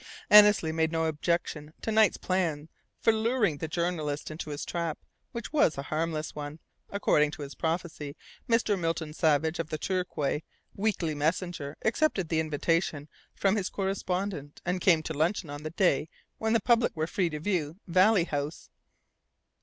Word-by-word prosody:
Annesley 210 -6 +8
made 160 0 +1
no 165 0 0
objection 155 -1 -1
to 225 - -1
Knight's 215 -3 +4
plan 165 -5 -1 0.3
for 225 - +4
luring 220 - +1
the 160 - -3
journalist 155 -3 -2
into 155 0 -6
his 145 0 -4
"trap," 170 -3 -2 0.3
which 235 +4 -6
was 285 - +3
a 140 - -3
harmless 155 +1 -2
one. 150 0 -6 0.3
According 150 -7 +2
to 150 0 -7
his 140 -1 -7
prophecy, 160 -1 -3 0.3
Mr. 220 -4 +2
Milton 165 -2 -2
Savage 160 +1 +2
of 165 - -2
the 155 - -2
Torquay 165 -5 -1 0.3
Weekly 195 -6 0
Messenger 155 -1 -2
accepted 220 - +1
the 160 - +1
invitation 155 -1 0 0.3
from 195 +1 +2
his 195 -3 -1
correspondent, 190 -5 -3
and 180 +1 -1
came 170 -6 +4
to 160 - -4
luncheon 160 +1 0
on 145 0 -6
the 155 - -4
day 165 -4 +2 0.3
when 220 0 +1
the 230 - +4
public 235 -1 +3
were 155 - +1
free 175 +1 0
to 150 -1 -5
view 165 -3 -1
Valley 185 +2 +4
House. 145 -1 -4
165 Hz, 160 wpm, -29 LUFS, 150-190 Hz, 0.3 s, Annesley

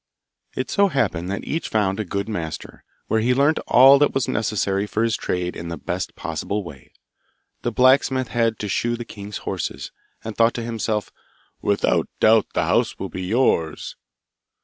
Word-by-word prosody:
It 130 - -3
so 200 0 +4
happened 110 - -1
that 100 - -3
each 160 - -3
found 100 -2 0
a - - 0
good 100 +1 -3
master, 80 -8 -6 0.2
where 110 - +1
he 125 +3 +2
learnt 145 +4 +3
all 135 +3 +7
that 145 - +2
was 135 -3 +1
necessary 105 -2 0
for 110 +2 -1
his 115 -1 +1
trade 90 0 -2
in 85 - -6
the 85 0 -5
best - - -4
possible 105 0 -3
way. 70 -7 -12 0.7
The 120 - -1
blacksmith 130 +1 +3
had 115 -1 +1
to 105 - -4
shoe 120 +4 0
the 120 0 -7
king's 105 -2 -8
horses, - - -4 0.3
and 110 -1 -6
thought 115 0 +3
to 120 - -3
himself, 110 -2 -2 0.5
'Without 100 -1 +1
doubt 110 0 +5
the - - +1
house - - +1
will - - -5
be 95 - -6
yours! 95 - 0
110 Hz, 175 wpm, -22 LUFS, 100-125 Hz, 0.7 s, all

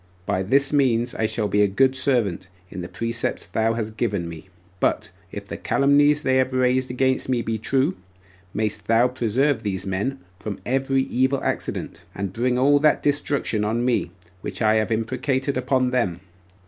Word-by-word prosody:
By 95 -1 0
this 135 +9 +2
means 125 -4 +2
I 110 - 0
shall 110 -1 -1
be 105 0 +2
a 105 - +5
good 130 +7 +2
servant, 115 -9 0 0.2
in 95 - -6
the 85 - -7
precepts 115 +6 -2
thou 110 +1 0
hast 110 -1 -4
given 100 -6 -1
by 85 - -6
me. 85 +3 -10 0.3
But - - 0 0.2
if 100 0 -7
the - - -6
calumnies 145 +1 +3
they 130 0 +2
have 130 0 +1
raised 130 0 +2
against 130 +1 0
me 120 -2 +1
be 110 -1 -2
true, 135 - +1 0.6
mayst 110 +1 -2
thou 115 +2 +4
preserve 125 +1 0
these 100 -2 -3
men 100 +8 -2 0.2
from 100 -1 -5
every 135 +1 +1
evil 130 +1 0
accident, - - -3
and 95 -1 -4
bring 125 +3 0
all 145 +3 +4
that 150 +1 +3
destruction 140 -6 0
on 115 +3 0
me 120 -8 +1 0.3
which - - -5
I 110 -1 +3
have 110 +1 0
imprecated 130 +5 -1
upon 130 0 +1
them. 95 -9 0
120 Hz, 180 wpm, -23 LUFS, 105-130 Hz, 0.6 s, a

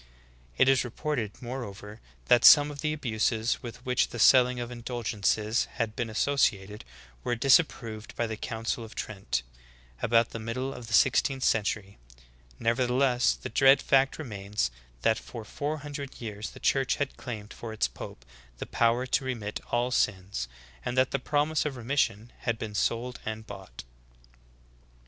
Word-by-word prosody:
It - - +5
is 135 -1 +4
reported, 120 -3 -3
moreover, 110 -4 -7 0.2
that 120 - +5
some 145 -1 +9
of 145 -1 -8
the 150 - 0
abuses 115 -5 0
with 120 0 -9
Vv^hich 125 -1 +2
the 120 - -7
selling 125 +2 +6
of 120 0 -5
indulgences 115 -2 -1
had 115 -3 -2
been 120 -2 -2
associated 105 -4 0 0.4
were 120 - 0
disapproved 115 -4 +2
by 120 - 0
the 110 -1 -4
Council 115 +2 -3
of 110 - -11
Trent, 95 - -3 0.6
about 115 0 +3
the 115 - -5
middle 130 +4 -3
of 120 -2 -9
the 115 - +1
sixteenth 135 +3 +3
century. 105 - 0 0.6
Nevertheless, 125 - +2
the - - -7
dread 135 +1 +6
fact 135 0 +3
remains 105 - -3 0.3
that 110 0 +3
for 115 -3 -9
four 145 +7 -3
hundred 140 -2 -7
years 105 -2 -5
the - - -13
Church 135 -2 +2
had 140 -1 -2
claimed 110 -4 -7
for 115 - -7
its 110 - +1
pope - - -10 0.3
the - - -5
povver 120 +2 +2
to 135 - +2
re 130 -1 -2
mit 105 -2 -5
all 120 +1 0
sins, 95 - 0 0.4
and 120 - -3
that 130 0 +3
the 140 - 0
promise 150 +3 +1
of 150 -3 -3
remission 120 -3 -1
had 115 -1 -1
been 110 -2 -6
sold 120 +4 -1
and 110 0 -5
bought." 95 - -10
120 Hz, 160 wpm, -28 LUFS, 110-130 Hz, 0.6 s, some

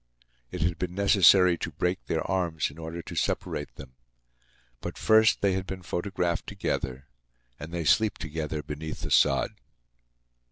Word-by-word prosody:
It 90 -3 -3
had 85 0 -1
been 90 0 -3
necessary 95 -3 +5
to - - -3
break 90 +4 -2
their - - -1
arms 85 -6 -1
in 75 - -14
order 80 +1 -6
to - - -8
separate 75 -1 -2
them. 65 -2 -11 0.9
But, - - -6
first, 110 0 +4
they 100 -2 +2
had 95 0 -3
been 95 -1 -6
photographed 85 -1 -2
together; 65 +1 -3 0.5
and 80 +3 -8
they 85 -1 -3
sleep 110 +6 +3
together 75 0 -4
beneath 80 +1 -6
the - - -5
sod. - - +3
85 Hz, 155 wpm, -27 LUFS, 80-95 Hz, 0.9 s, necessary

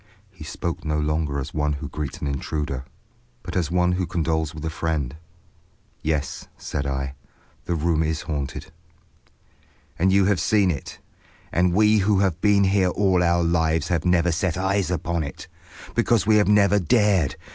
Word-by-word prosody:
He - - -12
spoke 85 -1 -4
no 75 -1 -1
longer 75 -1 -1
as 65 - -6
one 75 -1 0
who 70 +1 -5
greets 75 0 -5
an - - -2
intruder, 70 -1 -3 0.6
but - - -7
as 85 -4 0
one 90 0 +2
who 90 0 -1
condoles 80 -3 -1
with 75 +1 -7
a 80 - -2
friend. 80 -5 -2 0.9
"Yes," 75 -3 -2
said 70 -1 -4
I, 65 0 -3 0.5
"the 85 - -1
room 80 0 +1
is 80 0 -1
haunted." 70 -4 -5 1.3
"And 95 +3 +3
you 100 0 +4
have 100 -1 +2
seen 100 -4 +3
it. 70 - -6 0.5
And 90 +1 +2
we 105 +1 +5
who 100 +1 +2
have 95 -3 0
been 100 -1 +4
here 95 -1 +3
all 95 -1 +2
our 85 0 +2
lives 80 -2 +1
have 85 -3 0
never 90 -1 +2
set 90 +1 -1
eyes 95 0 0
upon 85 -1 -1
it. 70 - -7 0.5
Because 115 -5 +2
we 110 0 +5
have 105 - +3
never 105 0 +4
dared. 95 - +2
85 Hz, 170 wpm, -23 LUFS, 75-95 Hz, 1.3 s, we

